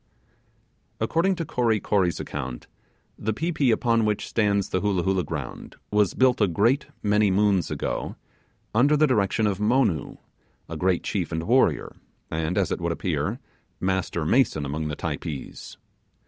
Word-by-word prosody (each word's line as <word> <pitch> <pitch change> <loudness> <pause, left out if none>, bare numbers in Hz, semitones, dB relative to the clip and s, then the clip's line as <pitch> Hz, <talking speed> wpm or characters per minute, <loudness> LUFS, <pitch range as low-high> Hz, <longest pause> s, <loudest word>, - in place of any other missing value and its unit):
According 165 +12 +1
to 165 - -3
Kory 115 -5 +1
Kory's 95 -5 +1
account, 65 -4 -5 0.5
the 110 +2 -1
pi 165 +10 -2
pi 150 -4 0
upon 115 -1 +3
which 105 -1 -1
stands 100 -3 +1
the 95 - 0
Hoolah 100 -4 +1
Hoolah 95 -1 +1
ground 75 -5 -6 0.2
was 105 -3 +2
built 130 -2 +3
a 105 - +5
great 115 - +2 0.2
many 105 0 +3
moons 100 -2 +2
ago, - - -3 0.6
under 140 +7 +4
the 155 - +5
direction 110 -4 +1
of 100 -2 0
Monoo, 105 - +1 0.5
a 80 - -6
great 90 +2 +1
chief 90 -5 -2
and 80 0 -2
warrior, 125 +8 +2 0.4
and, 80 +2 -1
as - - +1
it - - -2
would - - 0
appear, - - -2 0.4
master 95 -3 -1
mason 80 - +2
among 75 +3 -3
the 75 - -3
Typees. 75 -2 -6
100 Hz, 155 wpm, -25 LUFS, 85-115 Hz, 0.6 s, a